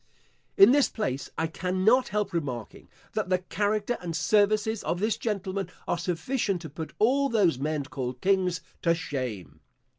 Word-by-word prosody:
In 195 +5 +9
this 285 0 +4
place 140 - -3
I 160 - +1
cannot 185 +9 +2
help 210 -1 -2
remarking, 130 -9 -4 0.2
that 215 -4 -2
the 185 - +3
character 205 +5 -1
and 170 -2 -4
services 210 +4 +2
of 175 - -1
this 215 +2 +1
gentleman 195 -4 -3 0.2
are 175 - 0
sufficient 180 +2 -1
to 160 - -7
put 160 +1 -7
all 275 +5 +3
those 190 - +2
men 150 +1 -1
called 130 -2 -5
kings 185 -1 +1 0.2
to 170 -1 +3
shame. 120 - -5
185 Hz, 155 wpm, -27 LUFS, 160-210 Hz, 0.2 s, In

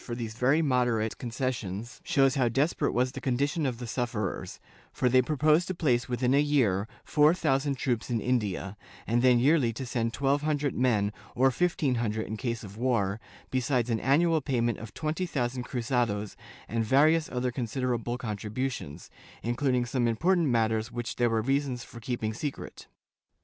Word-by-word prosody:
286 125 +6 0
JJSW8 125 -2 +2
[Book - - 0
VIII 110 +1 0
concessions 120 -3 -4
shows 135 -5 +3
how 130 -4 +2
desperate 145 +4 +1
was 125 +1 +1
the 135 - -7
condition 140 +5 0
of 125 -3 -3
the 120 - -6
sufferers, 115 -5 -3 0.3
for 125 - 0
they 130 +1 +5
proposed 155 +5 +2
to 185 - -3
place 125 -8 +1
within 125 +1 +1
a 140 +1 +4
yesiT 115 -9 +2 0.2
four 150 +2 +4
thousand 140 -4 +1
troops 120 -3 -2
in 120 -2 0
India, 105 -5 -1 0.3
and 120 +3 +1
then 125 -1 +5
yearly 135 -1 +3
to 130 +4 -6
send 115 -2 -1
twelve 140 +3 +1
hundred 150 -2 0
men, 110 -5 +1 0.2
or 130 +2 +4
fifteen 155 -2 +1
hundred 110 -1 -1
in 110 - -5
case 115 0 -3
of 100 0 -10
war, 115 -5 0 0.3
besides 125 -2 0
an 110 - +1
annual 160 +5 +3
payment 120 -5 0
of 115 -1 -8
twenty 160 +4 -2
thousand 125 -4 -2
cruzados 120 -5 -1 0.3
and 115 +1 -1
various 155 +7 +3
other 125 0 -1
considerable 120 -1 -2
contributions, 110 - -4 0.3
including 125 +1 +1
some 120 0 0
important 170 +9 +2
matters 110 -2 +1
which 120 0 -5
there 120 -1 +3
were 110 -1 0
reasons 135 -1 0
for 115 - -11
keeping 110 -2 -3
secret. 140 +5 -6
125 Hz, 170 wpm, -28 LUFS, 115-140 Hz, 0.3 s, they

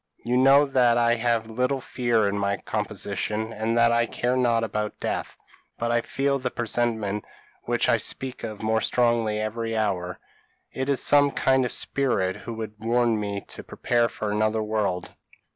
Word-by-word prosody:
You 120 +1 0
know 135 +3 +6
that 125 -4 +3
I 120 0 +3
have 115 -1 0
little 125 +4 -1
fear 120 -4 0
in 100 - -1
my 100 0 0
composition, 105 +1 -3
and 110 +2 -1
that 115 0 +5
I 120 0 +2
care 125 +2 -1
not 120 -3 +2
about 105 -1 -3
death; - - -3 0.4
but 120 0 -1
I 120 0 +2
feel 140 +3 -1
the 125 -1 -2
presentiment 110 -4 -1 0.4
which - - +1
I - - +4
speak 130 -1 -3
of 110 -2 -6
more 110 +1 +1
strongly 115 -3 +1
every 115 +1 -2
hour. 90 -4 -1 0.5
It 130 +1 -3
is 140 - +1
some 145 0 +5
kind 130 -2 +2
spirit 115 -11 0
who 115 - -7
would 110 -1 -6
warn 115 -1 +2
me 100 -1 -3
to - - -8
prepare 120 -1 0
for 105 -1 -4
another 110 +1 +1
world. 105 -4 -2
115 Hz, 170 wpm, -25 LUFS, 105-125 Hz, 0.5 s, know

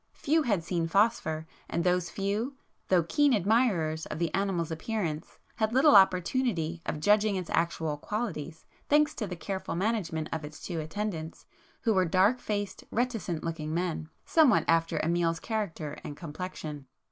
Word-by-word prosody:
Few 315 +3 +1
had 205 - 0
seen 170 -1 -1
'Phosphor,' 165 -5 +1 0.2
and 170 - -1
those 180 -1 +1
few, 210 +7 -2 0.3
though 180 -3 +4
keen 290 - +3
admirers 190 -7 +1
of - - -5
the 165 -1 -1
animal's 185 -4 0
appearance, 160 -2 -3 0.2
had 220 0 0
little 270 0 +6
opportunity 185 -3 +3
of 150 - -2
judging 205 +4 +3
its 185 -2 -4
actual 160 -2 0
qualities, 170 -4 -4 0.2
thanks 300 +1 +4
to 215 - -4
the 180 - -5
careful 190 +1 -4
management 180 -5 -1
of 160 -1 -3
its 150 +1 -8
two 170 -3 -4
attendants, 160 0 -4 0.4
who 225 - +2
were 185 -2 +3
dark 190 +8 +3
faced, 205 -3 -3
reticent 225 -9 -1
looking 160 -1 -3
men, 170 -3 -2 0.2
somewhat 305 -8 +4
after 165 0 +2
Amiel's 165 0 +1
character 175 -10 -3
and 145 - -7
complexion. 155 -4 -6
180 Hz, 155 wpm, -29 LUFS, 160-215 Hz, 0.4 s, little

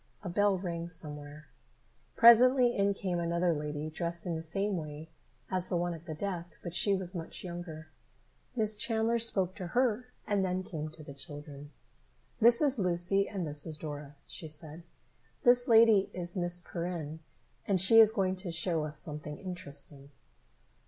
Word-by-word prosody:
A 185 - -4
bell 205 +2 +2
rang 170 -2 -5
somewhere. 150 -2 -4 0.7
Presently 245 +1 +6
in 200 0 +1
came 180 -3 -2
another 170 +1 +1
lady, 150 0 -4
dressed 170 +1 -3
in 175 -2 -2
the 160 - -4
same 195 +5 -1
way 155 -1 -7 0.4
as 185 -1 +1
the 175 - 0
one 175 0 -1
at 165 +1 -11
the 155 - -5
desk, 175 -1 -3
but 175 - -6
she 200 +2 +3
was 185 -1 0
much 165 -2 -7
younger. 170 -3 -8 0.7
Miss 215 -2 +2
Chandler 225 +2 +1
spoke 190 -5 +3
to 185 -3 -7
her 250 -1 +1 0.2
and 200 -2 0
then 185 0 -1
came 155 -4 -6
to 155 0 -10
the 140 - -10
children. 145 +1 -10 0.7
"This 235 +4 +6
is 275 -4 +3
Lucy 180 +2 +1
and 190 -4 -4
this 150 +1 0
is 155 -1 -6
Dora," 145 -2 -8
she 165 - -7
said. 155 +1 -4 0.6
"This 245 +1 +5
lady 225 -4 +5
is 175 -1 -2
Miss 175 -1 0
Perrin, 170 -3 -5 0.5
and 195 -2 +2
she 225 +5 +7
is 220 -1 +8
going 190 -4 0
to 185 -1 -5
show 165 -1 -1
us 150 0 -4
something 150 -1 -6
interesting." 145 -6 -7
175 Hz, 170 wpm, -30 LUFS, 155-200 Hz, 0.7 s, is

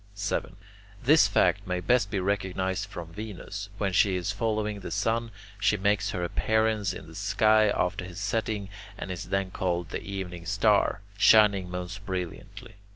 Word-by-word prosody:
7. 100 -2 -2 0.5
This 145 -3 +6
fact 100 0 +2
may 90 0 -1
best 100 +3 +2
be 100 - -1
recognized 95 0 -1
from 85 -4 -8
Venus. 100 0 -7
When 100 -2 -1
she 95 +1 +4
is 90 +2 -1
following 105 -1 -1
the 95 - -7
sun, 115 +3 0 0.3
she 100 +2 +2
makes 100 0 +1
her 90 - -3
appearance 110 +2 +1
in 90 - -8
the 80 - -13
sky 105 +3 +3
after 90 -1 0
his 90 0 -8
setting, 105 -1 -2 0.3
and 95 - -5
is 90 - -5
then 95 -1 -1
called 90 -2 -2
the - - -3
Evening 90 -3 -6
Star, 100 0 +2 0.2
shining 100 -5 +5
most 90 +2 -6
brilliantly. 95 0 -6
100 Hz, 160 wpm, -27 LUFS, 90-105 Hz, 0.5 s, This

